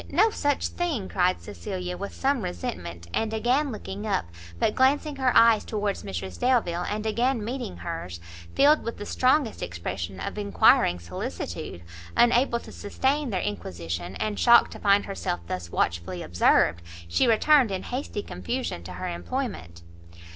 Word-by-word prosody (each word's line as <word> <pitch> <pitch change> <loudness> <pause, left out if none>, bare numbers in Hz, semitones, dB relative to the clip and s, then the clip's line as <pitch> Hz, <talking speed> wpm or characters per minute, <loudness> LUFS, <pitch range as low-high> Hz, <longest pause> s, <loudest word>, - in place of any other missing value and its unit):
no 420 +9 +4
such 290 -7 0
thing!" 310 - -2
cried 180 0 +1
Cecilia 185 -3 -5
with 200 +2 -5
some 275 -2 +1
resentment, 85 - -5
and 220 -1 0
again 255 +6 +1
looking 205 -1 -6
up; 195 - 0 0.3
but 210 - +1
glancing 285 +3 +2
her 260 -2 +2
eyes 230 -1 +6
towards 210 -2 -2
Mrs 95 -2 -6
Delvile, 200 -9 +1
and 210 +1 -3
again 235 +1 0
meeting 245 -1 -4
hers, 130 - -6 0.4
filled 295 +2 +5
with 230 - -4
the 205 - -6
strongest 255 0 +1
expression 85 +1 -5
of - - -4
enquiring 90 -3 +4
solicitude, 85 0 -6 0.3
unable 240 0 +4
to - - -11
sustain 265 +7 -1
their 190 -4 -1
inquisition, 85 -1 -4
and 215 -1 -2
shocked 235 -1 +6
to - - -9
find 200 0 +3
herself 195 - -3
thus 85 -1 -5
watchfully 85 +1 -1
observed, 85 0 +3 0.3
she 85 0 +2
returned 255 +3 +5
in 190 -1 -3
hasty 245 -5 -4
confusion 90 -1 -4
to 90 +1 -8
her 90 - -5
employment. 85 -1 -4
200 Hz, 155 wpm, -26 LUFS, -, 0.4 s, eyes